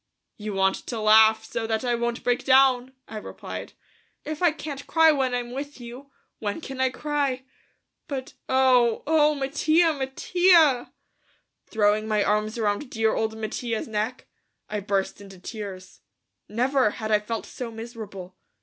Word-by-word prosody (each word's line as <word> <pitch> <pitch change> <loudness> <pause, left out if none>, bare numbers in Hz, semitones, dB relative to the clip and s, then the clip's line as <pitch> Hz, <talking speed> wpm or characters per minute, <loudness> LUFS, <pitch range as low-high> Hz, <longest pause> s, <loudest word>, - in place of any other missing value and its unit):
"You 210 -1 -6
want 195 0 +3
to 235 - -3
laugh 220 +1 +6
so 230 -1 -4
that 220 +2 -1
I 245 - +1
won't 235 0 -2
break 245 0 +1
down," 260 -1 +4
I 220 - -7
replied. 210 - -8 0.5
"If 310 +1 -5
I 350 -2 +5
can't 290 -3 -7
cry 320 -1 +5
when 265 -4 0
I'm 245 -1 -3
with 280 +2 -6
you, 245 +3 -10 0.3
when 205 +3 -3
can 270 -4 -6
I 260 - +3
cry? 280 -2 -2 0.6
But.... 265 -2 -5 0.2
Oh... 255 -3 +3
oh, 305 0 +3
Mattia, 310 +4 +2
Mattia!" 300 0 +3 0.8
Throwing 215 0 +1
my 210 -2 +2
arms 210 +2 0
around 215 +4 -1
dear 220 -1 +1
old 220 0 -2
Mattia's 225 +1 -3
neck, 220 +4 -3 0.4
I 210 - -3
burst 195 0 -2
into 195 -1 -12
tears. 190 -1 -8 0.5
Never 255 +2 +2
had 220 -1 -4
I 210 - +5
felt 225 +2 -5
so 245 -2 -6
miserable. 220 -5 -9
240 Hz, 150 wpm, -25 LUFS, 215-270 Hz, 0.8 s, laugh